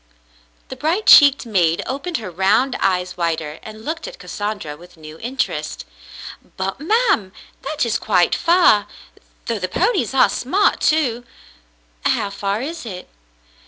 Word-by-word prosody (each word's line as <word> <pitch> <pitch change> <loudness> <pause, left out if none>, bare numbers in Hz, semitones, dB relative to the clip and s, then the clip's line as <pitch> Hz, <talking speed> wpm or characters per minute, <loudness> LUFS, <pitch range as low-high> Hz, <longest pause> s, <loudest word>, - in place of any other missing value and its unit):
The 260 - -6
bright 325 +11 -1
cheeked 285 -3 +7
maid 175 -7 +1
opened 295 +6 -3
her 200 -5 -7
round 205 +9 +2
eyes 185 -2 0
wider 160 -3 -2
and 215 0 -11
looked 330 +8 -4
at - - -10
Cassandra 205 - -5
with 175 +2 -17
new 155 0 -12
interest. 230 - -3 0.7
"But, 195 +4 -3
ma'm, 390 - +1 0.2
— - - -31
that 295 -1 -1
is 230 -1 -1
quite 180 -5 +2
far, 335 - +4 0.6
though 230 -2 -2
the 185 - -2
ponies 360 - 0
are 265 - +6
smart, 370 +12 +1
too." 255 -7 +1 0.8
"How 200 -1 0
far 200 +3 -3
is 330 +4 -6
it?" 190 -6 -8
220 Hz, 145 wpm, -20 LUFS, 185-300 Hz, 0.8 s, cheeked